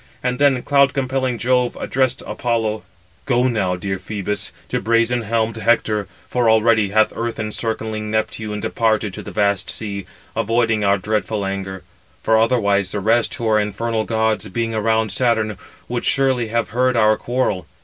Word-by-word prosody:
And 125 0 -1
then 140 -3 +3
cloud 140 -1 +3
compelling 130 -2 -1
Jove 125 +1 +1
addressed 130 -1 0
Apollo: 115 -3 -1 0.5
"Go 125 -1 +3
now, 100 -7 0
dear 95 +1 -3
Phœbus, 105 +1 -3 0.2
to - - -1
brazen 115 +2 +2
helmed 115 0 -1
Hector; 110 -2 +1 0.2
for 120 -2 +1
already 110 -2 +4
hath 110 +2 +3
earth 115 0 -3
encircling 110 0 -3
Neptune 110 -1 -2
departed 110 -3 0
to - - -6
the - - -8
vast 100 -2 0
sea, 100 -4 -5 0.3
avoiding 115 -1 +1
our 100 0 +3
dreadful 105 0 -1
anger; 95 -1 -4 0.4
for 110 - +3
otherwise 100 -5 +2
the 105 - -1
rest, 115 +4 +2
who 115 - -3
are 110 -1 +4
infernal 110 +2 -1
gods, 110 -1 0
being 115 +3 -2
around 110 0 +1
Saturn, 110 -1 +1 0.3
would 120 0 -3
surely 130 -4 +2
have 115 -4 -1
heard 125 +3 +1
our 110 -1 +5
quarrel. 115 -8 -1
110 Hz, 160 wpm, -20 LUFS, 105-120 Hz, 0.5 s, our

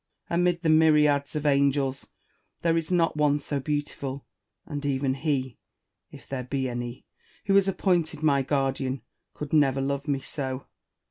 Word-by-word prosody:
Amid 175 0 +1
the 160 - +2
myriads 150 -2 +4
of 150 0 -2
angels, 140 -1 +2 0.6
there 165 -1 +3
is 165 +1 -1
not 170 -3 +2
one 150 -1 +3
so 145 -1 -3
beautiful; 140 -1 -3 0.4
and 145 -2 -5
even 135 -1 0
he 135 -3 -2 0.5
(if - - -14
there 135 -2 -4
be 130 +1 -2
any) 120 +1 -5 0.4
who 195 - +3
is 195 -1 +5
appointed 175 -5 0
my 140 -3 +4
guardian 135 -1 -1 0.3
could 150 0 -6
never 140 -3 +4
love 140 +1 -2
me 140 -2 +1
so. 130 -1 -5
140 Hz, 150 wpm, -26 LUFS, 135-155 Hz, 0.6 s, is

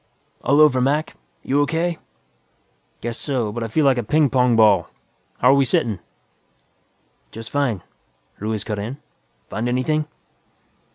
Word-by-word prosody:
"All 140 +2 +3
over, 145 -4 +5
Mac. 145 +4 0 0.3
You 140 +2 +1
O.K.?" 165 +3 -1 1.0
"Guess 115 0 -4
so, 125 -7 -1
but 120 +2 -4
I - - -2
feel 145 +7 +1
like 130 -3 +4
a - - -2
ping 145 +5 +2
pong 125 -2 +3
ball. 105 -6 +4 0.5
How're 125 +2 +5
we 140 0 +4
sittin'?" 115 -5 0 1.3
"Just 115 0 -9
fine," 125 -11 0 0.6
Ruiz 105 0 -2
cut 105 -2 -4
in. 115 +7 -5 0.5
"Find 115 +2 -3
anything?" 150 +5 0
125 Hz, 135 wpm, -21 LUFS, 110-145 Hz, 1.3 s, over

